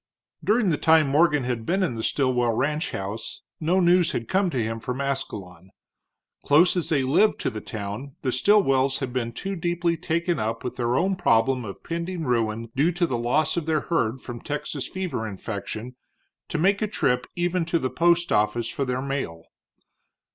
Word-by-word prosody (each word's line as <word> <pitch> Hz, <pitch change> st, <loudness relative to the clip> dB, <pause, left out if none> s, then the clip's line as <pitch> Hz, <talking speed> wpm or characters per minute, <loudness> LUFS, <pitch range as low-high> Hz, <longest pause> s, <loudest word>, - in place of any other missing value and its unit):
During 215 Hz, -3 st, +3 dB
the 150 Hz, -, 0 dB
time 160 Hz, -2 st, +5 dB
Morgan 150 Hz, -1 st, +3 dB
had 120 Hz, -2 st, -2 dB
been 190 Hz, -, +1 dB
in 175 Hz, -, 0 dB
the 115 Hz, -, -4 dB
Stilwell 125 Hz, -2 st, +1 dB
ranchhouse 115 Hz, -, -3 dB, 0.2 s
no 170 Hz, +4 st, +2 dB
news 175 Hz, -1 st, +4 dB
had 115 Hz, -, -3 dB
come 190 Hz, 0 st, +2 dB
to 135 Hz, -, -3 dB
him 115 Hz, -1 st, -1 dB
from 125 Hz, +3 st, -4 dB
Ascalon. 100 Hz, -10 st, -4 dB, 0.7 s
Close 160 Hz, +6 st, +5 dB
as 175 Hz, -, -1 dB
they 145 Hz, -4 st, +2 dB
lived 155 Hz, +11 st, +3 dB
to -, -, -1 dB
the 110 Hz, -, -6 dB
town, 110 Hz, +6 st, -6 dB
the 130 Hz, -, +1 dB
Stilwells 135 Hz, -5 st, +3 dB
had 130 Hz, -3 st, -4 dB
been 120 Hz, -2 st, -1 dB
too 195 Hz, +10 st, -4 dB
deeply 170 Hz, 0 st, 0 dB
taken 170 Hz, 0 st, -1 dB
up 115 Hz, +1 st, -2 dB
with 125 Hz, -, -4 dB
their 120 Hz, 0 st, 0 dB
own 190 Hz, +7 st, +2 dB
problem 130 Hz, -5 st, +2 dB
of 100 Hz, -, -8 dB
pending 170 Hz, +1 st, -3 dB
ruin 115 Hz, -3 st, -1 dB
due 150 Hz, +6 st, +3 dB
to 175 Hz, +1 st, +1 dB
the 130 Hz, -, -2 dB
loss 120 Hz, +8 st, +1 dB
of 165 Hz, -2 st, -2 dB
their 155 Hz, -2 st, +2 dB
herd 130 Hz, -7 st, -1 dB
from 120 Hz, -2 st, -7 dB
Texas 145 Hz, -1 st, -4 dB
fever 180 Hz, -12 st, -3 dB
infection, 110 Hz, +4 st, -6 dB, 0.5 s
to -, -, -2 dB
make 195 Hz, +5 st, +2 dB
a 215 Hz, -, +1 dB
trip 125 Hz, -11 st, 0 dB
even 175 Hz, 0 st, 0 dB
to 170 Hz, 0 st, +1 dB
the 130 Hz, -5 st, -2 dB
post 170 Hz, 0 st, +2 dB
office 115 Hz, +2 st, +1 dB
for 140 Hz, -, -2 dB
their 130 Hz, 0 st, -2 dB
mail. 135 Hz, -13 st, -3 dB
135 Hz, 185 wpm, -25 LUFS, 120-170 Hz, 0.7 s, time